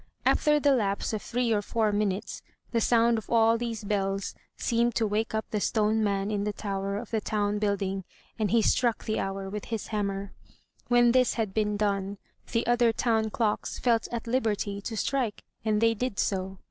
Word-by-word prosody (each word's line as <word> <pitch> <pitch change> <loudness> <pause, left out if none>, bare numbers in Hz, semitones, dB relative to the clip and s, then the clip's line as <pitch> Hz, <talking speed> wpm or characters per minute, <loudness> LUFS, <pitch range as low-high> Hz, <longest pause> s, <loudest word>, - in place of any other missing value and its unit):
After 300 0 +4
the 285 -1 +3
lapse 205 -4 0
of 215 - -2
three 245 -1 0
or 205 - +1
four 215 +1 0
minutes, 205 -1 -1 0.3
the 230 - +1
sound 230 0 +3
of 220 - -14
all 225 -1 +4
these 230 -2 -3
bells 195 -1 -1 0.2
seemed 235 0 +1
to 225 - +2
wake 220 +1 -1
up 220 - -1
the 210 - -1
stone 220 0 +2
man 200 0 0
in 205 -1 -1
the 210 - 0
tower 200 -1 -3
of 220 +1 -7
the 220 -2 0
town 210 -1 0
building, 195 -2 -1 0.4
and 215 -2 +1
he 230 -1 +3
struck 240 0 +2
the 215 - -1
hour 195 0 -3
with 205 +1 -5
his 225 -3 -4
hammer. 200 -2 -2 0.5
When 240 -1 +5
this 255 0 +3
had 220 -4 -1
been 210 -1 0
done, 200 -1 -1 0.3
the 230 - +1
other 240 -1 +4
town 225 -1 +1
clocks 215 -1 -1
felt 230 -3 +2
at 235 -1 -3
liberty 215 -4 -1
to 220 +2 -5
strike, 250 -3 -1 0.2
and 215 -1 +1
they 225 0 +4
did 225 -2 -3
so. 190 -1 -1
215 Hz, 195 wpm, -28 LUFS, 200-230 Hz, 0.5 s, When